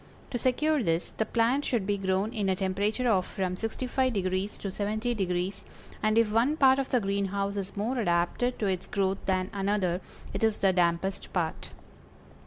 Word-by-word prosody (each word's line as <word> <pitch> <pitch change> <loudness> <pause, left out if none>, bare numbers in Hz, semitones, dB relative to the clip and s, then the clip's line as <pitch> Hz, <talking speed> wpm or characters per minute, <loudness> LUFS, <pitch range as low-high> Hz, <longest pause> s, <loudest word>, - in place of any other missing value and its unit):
To 245 - -2
secure 295 +5 +2
this, 165 -4 0
the 220 - -2
plant 240 +6 +2
should 235 -8 0
be 200 0 0
grown 190 +3 0
in 205 -4 0
a 190 - +2
temperature 200 +6 0
of 195 -5 +3
from 185 -1 -3
65° 215 -4 -1
to - - -5
70°, 200 -3 -1 0.4
and 215 +1 +2
if 230 -2 +4
one 245 +8 +2
part 265 -2 +5
of 270 - -2
the 250 - +3
greenhouse 200 0 -1
is 200 0 -5
more 240 +5 -1
adapted 175 +6 +1
to 215 - -1
its 185 -2 -1
growth 195 -1 -1
than 185 0 0
another, 195 -3 0 0.3
it - - -2
is 220 -1 +3
the 190 -1 +3
dampest 180 +2 0
part. 165 -4 -2
200 Hz, 175 wpm, -28 LUFS, 190-230 Hz, 0.4 s, part